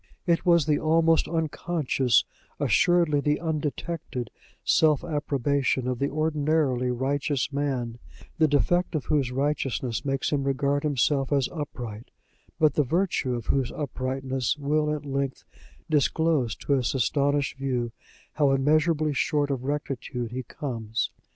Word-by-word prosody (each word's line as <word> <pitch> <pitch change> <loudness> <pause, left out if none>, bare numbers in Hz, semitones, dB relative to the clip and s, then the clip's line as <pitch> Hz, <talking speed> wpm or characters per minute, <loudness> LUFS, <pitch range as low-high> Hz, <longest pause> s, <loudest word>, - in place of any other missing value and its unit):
It 170 0 +1
was 170 -4 +5
the 150 -1 +2
almost 165 +1 +3
unconscious, 155 -6 +1 0.3
assuredly 170 -4 +3
the 150 +1 +1
undetected, 155 -4 -3 0.3
self 155 -1 +3
approbation 140 -4 0
of 125 -1 -2
the 140 - 0
ordinarily 150 -4 +1
righteous 135 +2 -1
man, 130 -5 -2 0.4
the 160 - +5
defect 175 +5 +1
of 150 - -2
whose 140 -5 +1
righteousness 135 -3 -1
makes 135 -2 -1
him 145 -2 +1
regard 140 +1 +1
himself 140 -1 +1
as 140 -3 +2
upright, 125 -8 -6 0.5
but 155 -3 +4
the 150 - +2
virtue 160 -4 0
of 120 -3 -5
whose 130 0 0
uprightness 130 -2 -2
will 150 +1 +1
at 150 -1 -3
length 135 -1 -2 0.4
disclose 150 -4 +1
to - - -6
his 130 -1 +1
astonished 140 +1 +1
view 125 -3 -1 0.4
how 145 -2 +3
immeasurably 155 +2 +2
short 145 +1 +1
of 130 -2 -3
rectitude 130 -4 -3
he 130 +1 -3
comes. 115 -4 -3
140 Hz, 130 wpm, -26 LUFS, 130-155 Hz, 0.5 s, was